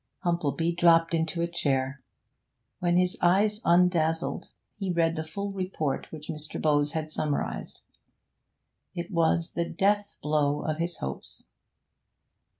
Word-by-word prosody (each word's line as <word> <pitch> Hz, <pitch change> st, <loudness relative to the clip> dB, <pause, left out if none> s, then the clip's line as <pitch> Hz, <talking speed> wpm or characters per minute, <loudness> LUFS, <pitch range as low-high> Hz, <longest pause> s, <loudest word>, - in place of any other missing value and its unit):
Humplebee 170 Hz, -1 st, 0 dB
dropped 165 Hz, -1 st, +5 dB
into 165 Hz, +1 st, 0 dB
a -, -, +1 dB
chair. 135 Hz, -5 st, -1 dB, 0.8 s
When 175 Hz, 0 st, +2 dB
his 180 Hz, 0 st, +2 dB
eyes 205 Hz, +4 st, +3 dB
undazzled, 170 Hz, -2 st, +2 dB, 0.3 s
he 195 Hz, -2 st, -1 dB
read 165 Hz, -1 st, +2 dB
the 160 Hz, -, -2 dB
full 200 Hz, +6 st, -5 dB
report 180 Hz, -8 st, -3 dB
which 155 Hz, -1 st, -8 dB
Mr. 150 Hz, -1 st, -3 dB
Bowes 145 Hz, -1 st, +2 dB
had 155 Hz, -1 st, -3 dB
summarised. 150 Hz, -2 st, -3 dB, 1.2 s
It 175 Hz, +2 st, -5 dB
was 165 Hz, -1 st, +2 dB
the 170 Hz, -1 st, -2 dB
death 205 Hz, +1 st, +1 dB
blow 150 Hz, -1 st, +1 dB
of 155 Hz, 0 st, -2 dB
his 170 Hz, +1 st, -2 dB
hopes. 65 Hz, 0 st, -5 dB
165 Hz, 130 wpm, -28 LUFS, 155-175 Hz, 1.2 s, dropped